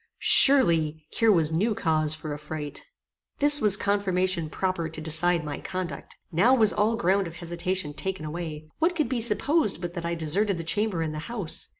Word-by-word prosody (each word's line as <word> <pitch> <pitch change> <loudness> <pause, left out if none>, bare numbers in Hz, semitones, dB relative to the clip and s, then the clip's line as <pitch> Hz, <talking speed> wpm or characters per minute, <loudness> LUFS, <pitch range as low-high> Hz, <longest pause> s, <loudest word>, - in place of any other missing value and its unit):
Surely, 165 - +5
here 225 -1 +2
was 165 -5 +1
new 210 +7 -1
cause 155 -3 -1
for 155 -1 -7
affright. 150 0 -8 0.6
This 290 0 +5
was 205 -1 +8
confirmation 185 -5 -2
proper 185 -2 -3
to 155 - -6
decide 165 +2 +2
my 150 -1 -6
conduct. 180 -6 -7
Now 200 +11 +3
was 220 -4 +4
all 215 +2 0
ground 195 -3 0
of 165 - -11
hesitation 170 -1 -4
taken 190 0 -6
away. 155 -1 -7
What 340 +3 0
could 305 -7 -2
be 255 -3 -2
supposed 255 - 0
but 175 -1 -7
that 170 -2 -7
I 170 0 -3
deserted 180 +5 -1
the 165 - -6
chamber 195 0 -2
and 155 -1 -5
the 155 - -6
house? 205 -9 -2
175 Hz, 185 wpm, -25 LUFS, 160-205 Hz, 0.6 s, was